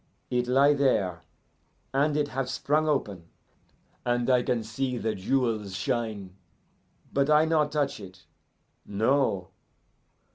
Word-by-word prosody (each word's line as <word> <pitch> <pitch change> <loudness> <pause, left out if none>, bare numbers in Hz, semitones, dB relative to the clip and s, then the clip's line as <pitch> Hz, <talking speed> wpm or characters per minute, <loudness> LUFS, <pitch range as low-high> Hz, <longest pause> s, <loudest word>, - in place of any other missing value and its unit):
It 125 0 0
lie 135 +3 +5
there, 100 - +1 0.7
and 145 +2 +2
it 145 -1 0
have 135 -1 -3
sprung 155 +2 0
open, 100 - -2 0.7
and 120 +1 +1
I 125 -1 +4
can 120 -2 -1
see 125 +3 -3
the 110 -1 -1
jewels 110 -2 -1
shine, 110 -5 -3 0.8
but 140 +1 +2
I 155 +1 +5
not 155 -2 +1
touch 145 -2 -1
it 95 0 -12 0.6
no. 105 -3 0
125 Hz, 120 wpm, -27 LUFS, 105-140 Hz, 0.8 s, lie